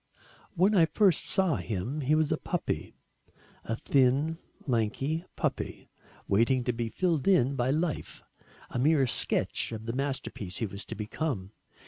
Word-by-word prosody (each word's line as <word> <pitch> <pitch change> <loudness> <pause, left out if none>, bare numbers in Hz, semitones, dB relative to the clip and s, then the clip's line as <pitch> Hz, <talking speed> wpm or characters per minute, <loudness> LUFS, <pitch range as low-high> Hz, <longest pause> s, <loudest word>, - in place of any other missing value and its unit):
When 190 +5 +4
I 170 -5 +5
first 180 +1 +3
saw 190 -7 +2
him, 115 +9 -3
he 145 +3 +3
was 155 -1 +2
a - - +2
puppy - - -3 0.7
a 115 - -2
thin 140 +6 +2 0.3
lanky 135 +7 0
puppy, - - -3 0.4
waiting 115 +5 +3
to 125 - 0
be 115 0 -2
filled 170 0 0
in 140 -8 +4
by 125 0 +1
life, 155 +2 -2 0.5
a - - -2
mere 145 +1 +4
sketch 120 - 0
of 110 -1 -6
the 115 - -2
masterpiece 130 -8 -3
he 115 - -1
was 100 -1 -7
to - - -6
become. 105 -2 -3
135 Hz, 150 wpm, -29 LUFS, 115-160 Hz, 0.7 s, I